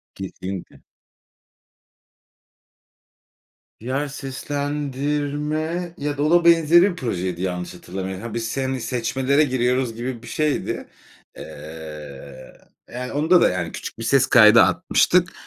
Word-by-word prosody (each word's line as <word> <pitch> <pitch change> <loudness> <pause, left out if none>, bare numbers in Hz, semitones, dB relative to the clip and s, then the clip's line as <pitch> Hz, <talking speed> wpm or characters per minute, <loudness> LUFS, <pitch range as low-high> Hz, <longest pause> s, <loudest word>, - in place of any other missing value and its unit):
Kesinlikle. 95 -1 -7 3.0
Ya, 135 +5 -2
seslendirme 145 +4 -3
ya 145 0 -3
da 145 - 0
o 155 - +1
da 175 0 +4
benzeri 170 0 +6
bir - - -8
projeydi, 90 - -3
yanlış 90 -1 -3
hatırlamıyor 95 +1 -6
ha, 115 0 -7
biz, 115 +2 -3
hani, 130 -1 -2
seçmelere 130 +4 +1
giriyoruz 125 -3 0
gibi 120 0 -5
bir 120 - -12
şeydi. 150 +4 -2 0.5
Eee, 75 -3 -10 0.4
yani, 125 +1 -5
onda 160 +5 +4
da, - - +5
yani, 90 -2 -3
küçük - - -7
bir - - -5
ses 135 +2 +3
kaydı 115 -1 +7
atmıştık. 180 +1 +2
130 Hz, 115 wpm, -22 LUFS, 95-150 Hz, 3.0 s, kaydı